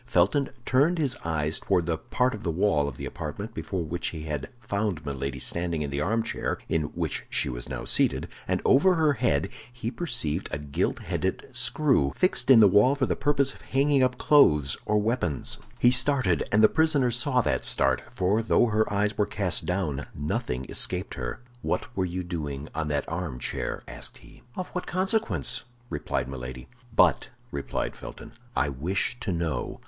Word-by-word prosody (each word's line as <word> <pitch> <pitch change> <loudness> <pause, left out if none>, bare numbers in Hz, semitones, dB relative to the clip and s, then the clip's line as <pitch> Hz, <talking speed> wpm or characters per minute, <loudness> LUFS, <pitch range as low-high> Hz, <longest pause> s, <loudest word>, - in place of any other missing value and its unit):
Felton 115 +9 +2 0.2
turned 145 +7 +3
his 140 -5 0
eyes 80 -1 -1
toward 90 -4 +1
the 85 -1 0
part 125 +9 0
of 105 - -6
the - - -2
wall 80 -4 +2
of 65 -4 -6
the - - -5
apartment 100 +9 -6
before 95 -6 -3
which 85 +3 -3
he 80 -2 -5
had 75 -3 -4
found 100 -8 -2
Milady 70 -1 -3
standing 85 +4 -1
in 70 - -4
the 70 +1 -1
armchair 115 +7 -1
in 80 -2 0
which - - -2
she - - 0
was - - -6
now - - -5
seated, - - +2 0.2
and - - 0
over 180 +8 +5
her 155 -3 +3
head 125 -1 +1 0.2
he 120 -1 -4
perceived 95 - -1
a - - -1
gilt 70 -1 -1
headed - - -2
screw, 130 - +2
fixed 180 -9 +2
in 125 -4 +9
the 105 - +8
wall 105 +8 +5
for 140 -2 +1
the - - 0
purpose 140 -1 +1
of - - -17
hanging 140 +1 +2
up 125 -1 +2
clothes 75 - +5
or 105 - +3
weapons. 105 - -1 0.2
He 120 - +5
started, 125 - +3
and 105 +1 +4
the - - +10
prisoner 150 -5 +2
saw 125 +2 +2
that - - 0
start—for 90 - +2
though 115 - +3
her 110 -2 +1
eyes 105 +1 +1
were 105 - +3
cast 95 -4 -1
down, 80 -7 -1
nothing 65 -3 -2
escaped - - -1
her. - - -5 0.2
"What 125 - -2
were 95 - +1
you 90 +1 -3
doing 75 -5 -5
on 80 -2 -2
that 75 -1 -1
armchair?" 80 -7 -3
asked - - -8
he. - - -17
"Of 185 - -4
what 180 - -5
consequence?" 185 - -1 0.3
replied 75 -4 -2
Milady. 65 -1 -7 0.3
"But," - - +4 0.2
replied - - -3
Felton, 115 0 -10 0.2
"I - - +2
wish 80 - 0
to 100 - -2
know." 85 -4 -2
95 Hz, 180 wpm, -27 LUFS, 75-125 Hz, 0.3 s, the